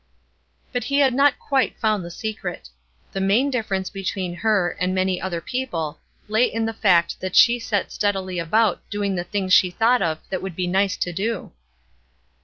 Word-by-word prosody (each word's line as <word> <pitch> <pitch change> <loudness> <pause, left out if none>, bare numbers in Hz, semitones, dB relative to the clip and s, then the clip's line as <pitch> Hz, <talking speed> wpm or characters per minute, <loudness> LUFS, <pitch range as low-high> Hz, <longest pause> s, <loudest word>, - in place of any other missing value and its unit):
But 245 - -2
he 280 - 0
had 275 -3 +4
not 280 +2 +4
quite 270 -2 0
found 215 -4 +1
the 170 - -7
secret. 190 -1 -6 0.4
The 195 - -3
main 220 +9 +2
difference 195 -7 -2
between 190 -2 -3
her 205 -4 +2
and 185 +1 0
many 185 -1 0
other 175 -3 -3
people 170 - -3 0.3
lay 220 +3 +3
in 225 0 -1
the 225 - -2
fact 180 -6 +2
that 185 -1 -4
she 240 +1 +6
set 210 -3 -2
steadily 190 -3 -1
about 210 +4 +2
doing 205 -1 -1
the 175 -2 -2
things 190 0 -1
she 185 - +6
thought 230 +7 +2
of 160 -1 0
that 190 - -2
would 190 -3 -6
be 180 - -1
nice 190 +2 +1
to 175 - -2
do. 205 +4 -3
195 Hz, 185 wpm, -22 LUFS, 180-225 Hz, 0.4 s, she